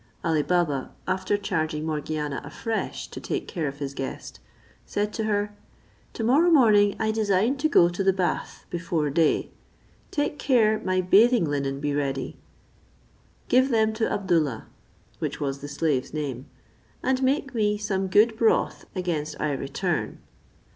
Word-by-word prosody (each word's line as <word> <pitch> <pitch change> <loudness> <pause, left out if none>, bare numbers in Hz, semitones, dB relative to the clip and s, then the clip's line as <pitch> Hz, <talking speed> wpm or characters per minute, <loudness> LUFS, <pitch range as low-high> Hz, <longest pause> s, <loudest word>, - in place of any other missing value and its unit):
Ali 160 -2 +2
Baba, 150 -5 0 0.2
after 185 +2 0
charging 160 -5 -2
Morgiana 150 -2 -3
afresh 225 -1 -4
to - - -8
take - - -3
care 165 -7 -3
of 140 0 -5
his 140 -2 -4
guest, 135 -1 -6 0.4
said 205 +1 -2
to 220 - -2
her, 205 -1 -1 0.6
"To 225 - -4
morrow 285 +10 +4
morning 215 -10 +5
I 220 0 +1
design 215 +3 +1
to 310 +3 +1
go 170 - +6
to 175 +3 -2
the 195 - +4
bath 185 -2 -2
before 170 -4 -1
day; 160 +1 +2 0.6
take 290 0 -2
care 220 -5 +3
my 185 0 0
bathing 215 +3 +5
linen 140 -2 -2
be 145 0 -1
ready, 140 -2 -2 1.1
give 260 +2 +4
them 220 -3 +2
to 220 +1 0
Abdoollah," 165 - 0 0.6
which - - -3
was 140 -1 -2
the 145 - -7
slave's 145 -2 -1
name, 140 -3 -4 0.6
"and 260 0 +1
make 275 0 0
me 210 -3 +1
some 195 -2 -1
good 215 +4 +4
broth 225 0 +1
against 160 -5 -3
I 150 - 0
return." 135 0 -2
185 Hz, 150 wpm, -25 LUFS, 150-220 Hz, 1.1 s, go